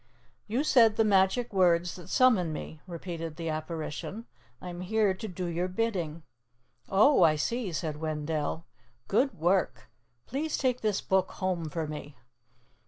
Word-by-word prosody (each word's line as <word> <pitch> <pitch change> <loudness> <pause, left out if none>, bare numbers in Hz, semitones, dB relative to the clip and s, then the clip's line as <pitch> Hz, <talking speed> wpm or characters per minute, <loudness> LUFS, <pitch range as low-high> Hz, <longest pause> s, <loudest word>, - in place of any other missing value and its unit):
"You 235 +7 0
said 230 -7 +5
the 225 - +3
magic 205 +3 +2
words 175 -2 +3
that 175 -3 -11
summon 220 -11 +4
me," 155 0 -7
repeated 165 -2 -6
the 165 -1 -4
apparition. 160 +7 -5 0.3
"I 180 - -7
am 175 0 -7
here 210 +1 +2
to 220 +4 -6
do 180 -2 -5
your 175 +1 -1
bidding." 180 -6 -2 0.7
"Oh, 215 +6 +5
I 160 -3 +6
see," 225 +6 -2
said 155 -2 -3
Wendell. 155 +1 -2 0.4
"Good 260 +7 +2
work! 180 +4 0 0.3
Please 295 +5 -2
take 250 -2 0
this 210 -3 0
Book 190 -1 +1
home 180 -4 -2
for 160 +1 -3
me." 150 -2 -8
180 Hz, 150 wpm, -29 LUFS, 160-215 Hz, 0.7 s, I